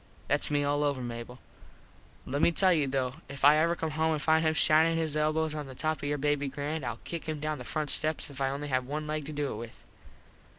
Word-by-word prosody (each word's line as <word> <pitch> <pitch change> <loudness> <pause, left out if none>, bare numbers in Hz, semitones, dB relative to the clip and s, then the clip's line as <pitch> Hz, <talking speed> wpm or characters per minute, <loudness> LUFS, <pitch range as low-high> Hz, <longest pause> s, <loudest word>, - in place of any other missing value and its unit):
Thats 145 - +1
me 145 -1 +1
all 145 +1 +1
over, 140 -2 0
Mable. 120 0 -6 0.9
Let 140 +3 -2
me 170 - +5
tell 185 +2 +5
you 150 -4 +1
though 130 0 -1
if 140 0 -2
I 150 +1 +8
ever 165 +2 +2
come 160 -2 -3
home 160 +1 +1
and 155 - -1
find 160 +1 +3
him 155 0 +2
shinin 160 +2 +4
his 160 -2 0
elbos 155 +1 +1
on 150 -2 -5
the 130 - -10
top 155 +3 -1
of - - -7
your 145 - 0
baby 145 0 0
grand 145 +2 -4
Ill 120 -2 -3
kick 165 -1 -5
him 155 -1 -3
down 155 -1 -3
the - - -6
front 150 +3 -2
steps 155 0 +1
if 140 0 -8
I 135 - +2
only 145 +2 -4
have 130 -1 0
one 150 +2 -3
leg 155 -1 -3
to - - -5
do 145 -1 -2
it - - -6
with. 115 0 -10
150 Hz, 255 wpm, -29 LUFS, 140-155 Hz, 0.9 s, I